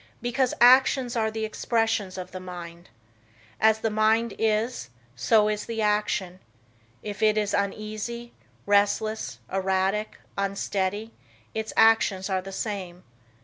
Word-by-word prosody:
Because 245 +1 0
actions 255 0 +5
are 220 -1 +1
the 220 0 -3
expressions 225 -3 -1
of 180 0 -7
the 185 - -6
mind. 175 -1 -9 0.7
As 220 0 +4
the 225 - 0
mind 220 +1 +2
is, 225 - 0 0.3
so 210 - +3
is 210 0 -2
the 230 -1 -4
action. 210 -3 0 0.6
If 205 -1 -6
it 215 0 +3
is 210 -1 0
uneasy, 215 +4 -3 0.3
restless, 205 - +1 0.2
erratic, 190 +2 0 0.2
unsteady, 200 +2 -2 0.4
its 220 0 -3
actions 210 -3 +4
are 190 -1 +1
the 195 +1 -9
same. 190 -3 -5
210 Hz, 125 wpm, -26 LUFS, 190-225 Hz, 0.7 s, actions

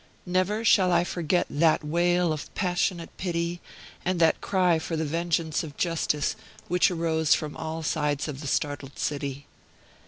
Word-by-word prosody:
Never 185 +5 0
shall 185 -4 +5
I 175 - +4
forget 175 0 0
that 155 +2 +2
wail 175 +2 +2
of 155 - -7
passionate 180 -2 -1
pity, 170 -1 -2 0.4
and 180 -1 0
that 165 -1 +3
cry 180 -4 +2
for 160 +1 -4
the 160 - -1
vengeance 165 0 0
of 150 -3 -9
justice, 165 -4 0 0.3
which 180 +2 +3
rose 160 -3 +2
from 150 -1 -5
all 160 0 -4
sides 150 -2 0
of 145 -2 -6
the 145 - -5
startled 145 -1 -2
city. 140 -1 -3
165 Hz, 155 wpm, -26 LUFS, 150-175 Hz, 0.4 s, shall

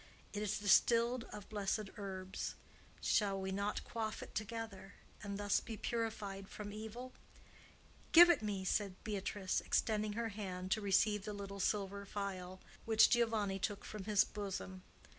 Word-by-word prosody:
It 205 - -2
is 210 0 0
distilled 235 +4 +4
of 210 - -9
blessed 205 0 -2
herbs. 190 -2 -5 0.5
Shall 200 -3 +2
we 190 0 -3
not 200 +2 -1
quaff 220 -2 -3
it - - -11
together, 215 -3 -5 0.3
and 200 -1 -4
thus 205 -1 +2
be 225 -2 -7
purified 210 -5 -3
from 205 -1 -7
evil?" 220 +4 -7 1.0
"Give 345 +1 +11
it 345 - +1
me!" 200 -3 -2
said 195 0 0
Beatrice, 200 -2 -1
extending 215 -1 +1
her 230 +1 -1
hand 185 -3 -5
to 220 - +2
receive 205 +1 +3
the 210 - -4
little 200 -1 -6
silver 200 0 0
vial 190 -2 -5 0.2
which 220 -1 +6
Giovanni 220 -5 +2
took 205 +1 -2
from 210 -3 -6
his 210 -1 +5
bosom. 195 -2 -5
205 Hz, 150 wpm, -37 LUFS, 195-220 Hz, 1.0 s, Give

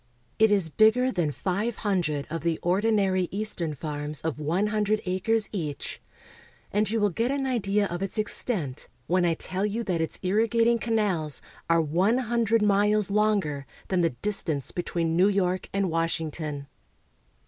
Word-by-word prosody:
It 220 0 +6
is 195 -6 +2
bigger 220 - +4
than 175 -7 0
five 200 +9 -2
hundred 170 -9 -1
of 165 - -3
the 165 -1 0
ordinary 190 -1 +2
eastern 185 -6 -1
farms 150 0 -3
of 160 -3 -3
one 165 +7 0
hundred 215 0 +1
acres 200 +4 +1
each; 155 -8 -4 0.7
and 210 +1 +1
you 225 +1 0
will 205 -1 +2
get 230 +7 0
an 275 0 -1
idea 210 -5 +1
of 175 -2 -4
its 195 +2 -3
extent 205 - 0 0.2
when 180 +3 +2
I 170 -1 +2
tell 185 +4 -3
you 210 +3 -1
that 180 -6 -1
its 160 - -2
irrigating 230 +4 +2
canals 200 - 0 0.3
are 165 0 +4
one 180 +10 +2
hundred 230 -3 +1
miles 205 0 +3
longer 200 -10 +1 0.2
than 185 -2 +2
the 165 - +3
distance 175 -9 -1
between 170 -2 -2
New 185 +4 +5
York 185 -2 0
and 195 -1 0
Washington. 160 -3 -2
195 Hz, 160 wpm, -26 LUFS, 165-215 Hz, 0.7 s, It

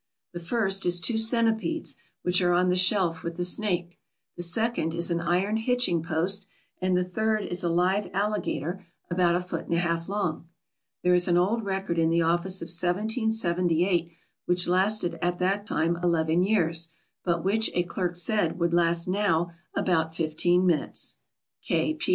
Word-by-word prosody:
The 175 - -5
first 195 +1 +1
is 175 0 +3
two 220 +5 +1
centipedes, 230 +6 +1 0.3
which 180 +1 +2
are 175 -1 +2
on 180 +1 +2
the 180 - +2
shelf 185 -3 +2
with 170 0 -5
the 175 - -1
snake; 175 -2 0 0.4
the - - -5
second 175 -2 +1
is 170 +1 0
an 170 - 0
iron 180 +5 0
hitching 225 -7 +1
post; 175 +5 0 0.3
and 185 -1 +1
the 180 - +1
third 215 +4 -1
is 175 +2 -1
a 170 - 0
live 185 +4 +1
alligator 195 -3 -2 0.3
about 175 -1 +2
a - - +1
foot 180 0 -5
and 170 - 0
a - - +1
half 170 0 -2
long. 180 -5 -3 0.6
There 180 - +3
is 180 0 +4
an 175 -1 +3
old 205 +5 0
record 190 -3 -2
in 165 0 +2
the 165 0 +2
office 175 +2 +1
of - - -5
1778, 180 -2 0 0.4
which 180 0 +2
lasted 185 +1 +1
at 175 0 -1
that 195 +3 -1
time 170 -1 0
eleven 165 -1 +1
years, 170 -5 +1 0.3
but 170 -2 -1
which, 220 +4 +1
a 175 - +2
clerk 175 0 -3
said, 175 0 +1
would 170 -1 0
last 170 0 +1
now 180 -3 0 0.2
about 160 -3 0
fifteen 175 +3 +1
minutes. 170 -4 0
180 Hz, 170 wpm, -26 LUFS, 170-200 Hz, 0.6 s, is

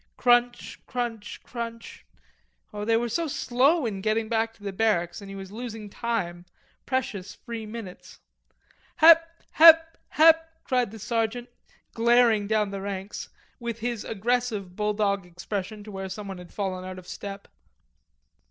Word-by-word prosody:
Crunch, 245 0 +2
crunch, 235 -4 -4
crunch; 230 -1 -7 0.7
oh, 205 0 -4
they 225 +1 +3
were 240 +1 0
so 330 +7 -1
slow 275 +3 +2
in 200 -4 -3
getting 220 +2 0
back 225 -1 +1
to 205 - -20
the 200 -1 -4
barracks 185 -4 0
and 200 - -10
he 195 - -7
was 195 -1 -8
losing 220 -2 -7
time, 175 -8 -3 0.4
precious 225 -7 -2
free 230 -3 -7
minutes. 215 -4 -9 0.8
"Hep, 330 +1 +6
hep, 325 0 +7
hep," 325 +1 +5
cried 250 -3 +1
the 225 - -10
sergeant, 230 +3 -2 0.4
glaring 230 -3 +4
down 210 -2 +1
the 195 -1 -5
ranks, 195 0 -5 0.3
with 235 -2 -5
his 235 -2 -2
aggressive 220 -3 -1
bulldog 210 -1 0
expression, 190 +4 -6
to 210 - -10
where 190 -1 -5
someone 195 -2 -6
had 180 -1 -12
fallen 190 -2 -3
out 185 0 -7
of 180 -1 -12
step. 200 0 -7
220 Hz, 145 wpm, -26 LUFS, 200-240 Hz, 0.8 s, hep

